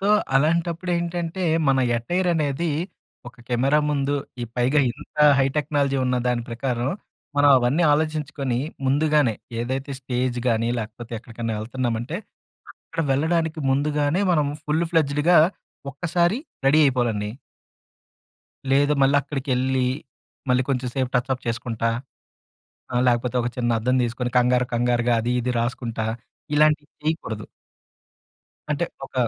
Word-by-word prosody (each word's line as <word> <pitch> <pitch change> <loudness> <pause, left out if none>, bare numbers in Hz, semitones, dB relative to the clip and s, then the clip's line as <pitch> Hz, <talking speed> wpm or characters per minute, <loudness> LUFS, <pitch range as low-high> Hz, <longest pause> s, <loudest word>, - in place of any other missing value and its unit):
So, 195 - -1 0.3
అలాంటప్పుడేంటంటే, 170 +3 0 0.2
మన 135 -1 +3 0.2
attire 175 +11 -1
అనేది 155 +1 0 0.6
ఒక 120 0 -17
కెమెరా 130 +4 +2
ముందు 140 -1 0 0.3
ఈ - - 0
పైగా 130 +5 +3
ఇంత - - -15 0.2
హై 135 - +4
టెక్నాలజీ 145 -2 +1
ఉన్న 125 0 +1
దాని 120 -1 +1
ప్రకారం 120 +1 -2 0.5
మనం 145 0 +5
అవన్నీ 125 +7 +1
ఆలోచించుకొని 150 -4 -1 0.3
ముందుగానే 145 -3 +3 0.3
ఏదైతే 130 +4 -3
స్టేజ్‌గాని, 125 -2 0
లేకపోతే 115 +1 -7
ఎక్కడికన్నా 115 0 -5
ఎళ్తన్నామంటే 120 +4 -3 0.7
అక్కడ 165 - -2
వెళ్ళడానికి 160 +3 0
ముందుగానే 145 +4 +1
మనం 150 -4 +2 0.2
ఫుల్‌ప్లేజెడ్‌గా 160 0 +3 0.5
ఒక్కసారి 175 - +1 0.3
రెడీ 145 +3 +5
అయిపోవాలండి. 120 -6 0 1.4
లేదు 145 +2 +4
మళ్ళక్కడికెళ్ళి, 135 -2 +1 0.7
మళ్ళీ 125 0 +3
కొంచెం 125 -1 -1
సేపు 130 -2 -1
టచ్ 125 +2 +1
అప్ 130 - -13
చేసుకుంటా, 115 -1 -2 1.1
ఆహ్, 120 +1 +2
లేకపోతే 120 +1 +1
ఒక 120 - -1
చిన్న 120 -2 +1
అద్దం 125 +3 +1
తీసుకొని, 120 +1 -2
కంగారు 125 0 +3
కంగారుగా 120 0 +2
అది 120 +2 0
ఇది 125 +1 -1
రాసుకుంటా, 115 -2 -2 0.5
ఇలాంటివి 150 0 +3
చేయకూడదు. 130 -9 -2 1.3
అంటే 150 +3 +1 0.2
ఒక - - -28
135 Hz, 115 wpm, -23 LUFS, 120-150 Hz, 1.4 s, మనం